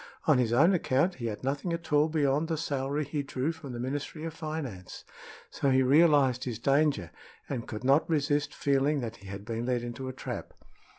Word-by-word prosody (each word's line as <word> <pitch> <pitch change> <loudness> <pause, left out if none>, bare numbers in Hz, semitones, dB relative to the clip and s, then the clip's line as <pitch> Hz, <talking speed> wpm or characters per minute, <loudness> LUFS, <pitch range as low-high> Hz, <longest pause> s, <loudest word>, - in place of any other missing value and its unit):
On 155 -7 +4
his 120 -3 +1
own 155 +11 +5
account 170 +1 +2
he 115 - -1
had 105 +1 -5
nothing 140 +6 -1
at 170 -2 -5
all 150 +2 +4
beyond 150 0 +1
the 160 -1 -1
salary 140 0 -2
he 145 +1 -2
drew 135 +2 -2
from 160 -5 -9
the 120 - -6
Ministry 145 +5 -4
of 165 -1 -4
Finance; 150 - -6 0.5
so 140 - 0
he 130 0 +4
realized 140 -3 +4
his 120 -4 -3
danger, 140 - +1 0.4
and 125 -5 -4
could 110 +1 -6
not 140 +6 +3
resist 145 -2 +1
feeling 140 +1 +1
that 115 -1 -5
he 100 - -14
had 100 +1 -7
been 115 +1 -3
led 125 -2 0
into 120 +2 -5
a - - -6
trap. - - -6
140 Hz, 200 wpm, -29 LUFS, 125-155 Hz, 0.5 s, own